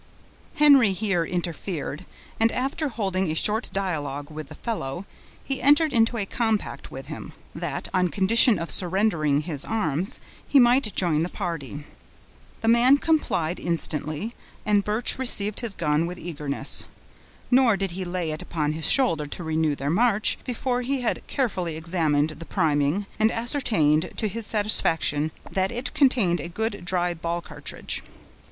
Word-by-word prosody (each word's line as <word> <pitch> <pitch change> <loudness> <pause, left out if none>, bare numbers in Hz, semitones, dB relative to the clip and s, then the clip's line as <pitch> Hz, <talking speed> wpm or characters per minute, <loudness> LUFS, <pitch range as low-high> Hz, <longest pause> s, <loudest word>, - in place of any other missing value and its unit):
Henry 275 -9 +6
here 190 -3 0
interfered, 175 -2 -4 0.3
and 225 +1 +4
after 275 +5 -1
holding 190 -6 -1
a 155 - -2
short 215 +7 +1
dialogue 145 -7 -3
with 155 -1 -7
the - - -10
fellow, 190 - -4 0.4
he 270 -1 -3
entered 295 +2 +4
into 230 0 +2
a 205 - -1
compact 220 0 -2
with - - -8
him, - - -8 0.2
that, - - -4
on 185 -1 +2
condition 215 +5 +5
of 165 0 -3
surrendering 175 -6 +2
his 150 -4 -1
arms, 185 -5 -1 0.3
he 280 - +5
might 240 -4 +3
join 165 -4 +2
the 170 - -1
party. 150 -7 -5 0.8
The 225 - -2
man 240 +4 +6
complied 235 - 0
instantly, 160 +4 -2 0.3
and 205 -1 +3
Birch 215 +5 -1
received 210 -5 0
his 230 -5 -3
gun 155 0 0
with 180 +1 -6
eagerness; 150 -5 0 0.7
nor 245 -5 +5
did 195 -2 -2
he 185 +2 -4
lay 175 -2 -3
it 155 - -5
upon 150 -3 -2
his 160 +1 -2
shoulder 165 - +2
to 175 - -6
renew 160 -2 0
their 140 +1 -2
march, 215 +2 +2
before 250 0 -2
he 265 +1 -1
had 240 - -1
carefully 185 - -2
examined 160 -3 0
the 165 - -8
priming, 155 +2 0
and 220 +1 +3
ascertained, 185 - +1
to 220 - 0
his 220 +1 -2
satisfaction, 165 -8 +3 0.2
that 190 0 0
it 245 +1 -2
contained 230 - +3
a 170 - -6
good, 205 0 -3
dry, 175 -1 +1
ball 170 +1 -3
cartridge. 150 -4 -6
185 Hz, 155 wpm, -25 LUFS, 160-230 Hz, 0.8 s, Henry